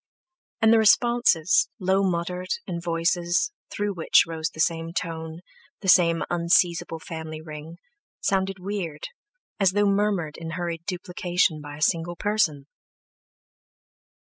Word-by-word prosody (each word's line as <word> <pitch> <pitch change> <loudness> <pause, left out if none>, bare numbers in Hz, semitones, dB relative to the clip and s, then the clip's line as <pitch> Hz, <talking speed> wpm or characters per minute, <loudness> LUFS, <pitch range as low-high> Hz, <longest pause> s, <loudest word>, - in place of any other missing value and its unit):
And 220 0 +6
the 225 - +5
responses, 220 -6 +3
low 190 +1 +1
muttered, 180 -1 -2 0.2
in 170 -3 -4
voices 170 - 0 0.2
through 205 0 -2
which 170 -3 +4
rose 165 0 -3
the - - -15
same 165 +1 0
tone, 160 -1 -5 0.4
the 195 - -6
same 170 -2 +5
unseizable 170 -1 +1
family 160 -1 -7
ring, 155 +1 -9 0.4
sounded 195 0 0
weird, 185 -6 -5 0.5
as 190 -2 +3
though 205 +1 +2
murmured 200 -6 0
in 165 -1 -6
hurried 170 -2 -4
duplication 180 -3 -1
by 145 0 -9
a 155 - -2
single 170 +1 0
person. 170 -8 0
170 Hz, 125 wpm, -25 LUFS, 165-190 Hz, 0.5 s, And